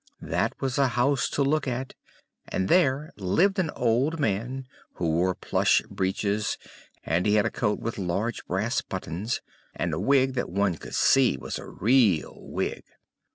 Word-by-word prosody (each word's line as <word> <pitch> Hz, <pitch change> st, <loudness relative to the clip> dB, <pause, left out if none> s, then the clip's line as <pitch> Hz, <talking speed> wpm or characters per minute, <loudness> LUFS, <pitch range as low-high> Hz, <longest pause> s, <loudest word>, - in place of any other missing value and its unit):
That -, -, -1 dB
was 135 Hz, +1 st, -1 dB
a 140 Hz, -, +5 dB
house 140 Hz, +2 st, +2 dB
to 140 Hz, -, 0 dB
look 145 Hz, +1 st, +1 dB
at; 130 Hz, +1 st, -3 dB, 0.5 s
and 95 Hz, 0 st, -1 dB
there 150 Hz, -3 st, +3 dB
lived 170 Hz, -, +2 dB
an 175 Hz, -4 st, +1 dB
old 125 Hz, +7 st, +1 dB
man, 125 Hz, +3 st, -1 dB, 0.3 s
who 85 Hz, -, -1 dB
wore 90 Hz, +3 st, +1 dB
plush -, -, +2 dB
breeches; 100 Hz, +2 st, -1 dB, 0.5 s
and 85 Hz, +5 st, 0 dB
he 105 Hz, -, +4 dB
had 105 Hz, 0 st, +3 dB
a 115 Hz, -, 0 dB
coat 105 Hz, -6 st, 0 dB
with 115 Hz, -2 st, -4 dB
large 100 Hz, +6 st, -2 dB
brass -, -, 0 dB
buttons, 95 Hz, +9 st, -4 dB, 0.3 s
and -, -, -2 dB
a -, -, -1 dB
wig 135 Hz, -1 st, +3 dB
that 125 Hz, -, -2 dB
one 95 Hz, -1 st, 0 dB
could -, -, -8 dB
see 130 Hz, -, +4 dB
was -, -, -5 dB
a -, -, -9 dB
real 110 Hz, -, +2 dB
wig. -, -, -4 dB
120 Hz, 165 wpm, -26 LUFS, 95-135 Hz, 0.5 s, a